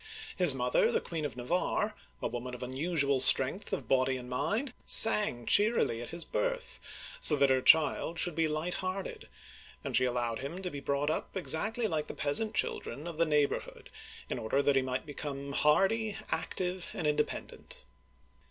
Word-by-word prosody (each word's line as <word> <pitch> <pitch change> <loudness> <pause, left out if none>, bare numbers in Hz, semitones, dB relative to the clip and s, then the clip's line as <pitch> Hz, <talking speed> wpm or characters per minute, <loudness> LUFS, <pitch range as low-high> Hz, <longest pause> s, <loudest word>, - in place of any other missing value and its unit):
His 175 -8 +6
mother, 125 -1 +1
the - - +1
Queen 160 -3 -5
of 145 - -6
Navarre, 180 - -2 0.3
a - - 0
woman 125 +1 -6
of 125 - -8
unusual 140 +1 -1
strength 135 +9 +5
of 195 - -4
body 130 0 +1
and 125 -1 -9
mind, 185 - -2
sang 210 - +6
cheerily 205 - +1
at 120 - -8
his 170 0 -4
birth, - - -3 0.4
so 150 - +8
that 140 -1 +2
her 130 -1 +2
child 160 +3 +3
should 175 0 +1
be 165 0 0
light 155 +3 -3
hearted; 185 +1 -6 0.5
and - - -4
she 130 - +3
allowed 120 -2 -2
him 140 +7 -7
to 180 - -4
be 145 - -7
brought 140 +2 -2
up 175 - -5
exactly 215 +7 0
like 155 -7 -2
the - - -8
peasant 210 +10 -1
children 140 +7 -3
of 170 -2 -7
the 165 0 +1
neigh 150 -1 +3
borhood, - - -8 0.4
in - - -4
order 120 +5 -1
that 140 0 +2
he 135 - +3
might 130 +2 -4
become 140 -1 -6
hardy, 195 +9 +1
active, 180 -1 -3
and 165 - -5
independent. 150 - -3
150 Hz, 180 wpm, -30 LUFS, 130-185 Hz, 0.5 s, so